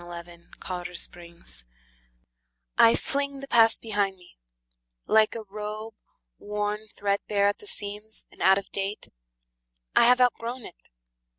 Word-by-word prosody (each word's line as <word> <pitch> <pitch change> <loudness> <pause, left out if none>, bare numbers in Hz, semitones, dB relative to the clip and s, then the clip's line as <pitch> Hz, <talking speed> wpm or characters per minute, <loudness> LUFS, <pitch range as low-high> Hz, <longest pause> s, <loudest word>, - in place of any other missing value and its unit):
Ella 175 0 -8
Wheeler 175 0 -14 0.3
Wilcox 180 -1 0
The 175 -1 -13
Past - - 0 1.1
I 230 - +6
FLING 280 0 -1
the 275 - -8
past 225 -3 +5
behind 205 -3 -1
me, 180 -1 -19 0.7
like 220 0 +4
a 225 - -5
robe 215 +2 -6 0.5
Worn 210 +1 -3
threadbare 200 0 0
at 205 - +1
the 420 - -10
seams, 210 - -2
and - - -15
out 190 0 +6
of 200 - -6
date. 195 +1 -3 0.9
I - - +7
have 250 +1 +5
outgrown 245 0 0
it. - - -11
210 Hz, 140 wpm, -26 LUFS, 195-225 Hz, 1.1 s, I